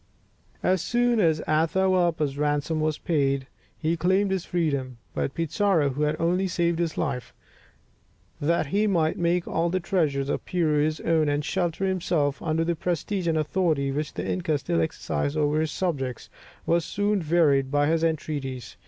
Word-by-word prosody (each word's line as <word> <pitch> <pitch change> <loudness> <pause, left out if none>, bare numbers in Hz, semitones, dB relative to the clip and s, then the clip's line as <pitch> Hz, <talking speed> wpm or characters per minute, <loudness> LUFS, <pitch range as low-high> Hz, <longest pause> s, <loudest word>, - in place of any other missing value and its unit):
As 185 -1 +2
soon 240 +1 +2
as 160 -5 +3
Atahualpa's 165 -2 +2
ransom 145 +2 0
was 155 -1 0
paid, 140 -4 0 0.3
he 160 +1 0
claimed 190 +4 +2
his 190 -2 -1
freedom; 140 -8 -1 0.2
but 135 - -2
Pizarro, 165 -1 +1
who 135 +2 -4
had 150 +1 +1
only 180 +3 +1
saved 170 -1 0
his 170 -2 -1
life 135 -6 -3 1.0
that 165 +2 +1
he 205 +9 +1
might 165 -5 +1
make 175 0 +1
all 170 +1 0
the 185 +2 0
treasures 155 -7 0
of - - -2
Peru 155 -5 +1
his 155 0 -1
own, 160 -2 +2
and 145 0 -1
shelter 175 +2 -1
himself 170 -6 0
under 160 0 0
the 170 +1 0
prestige 180 +3 -2
and 160 -1 +2
authority 155 -3 +1
which 150 +2 -3
the 90 +2 -3
inca 95 - 0
still 85 -11 -1
exercised 80 - -2
over 150 +1 +2
his 160 -1 -1
subjects, 135 -9 -3 0.3
was 170 0 +2
soon 205 +1 0
wearied 145 -6 +3
by 145 +1 +2
his 165 +2 +1
entreaties. 145 -5 -3
160 Hz, 165 wpm, -26 LUFS, 145-175 Hz, 1.0 s, as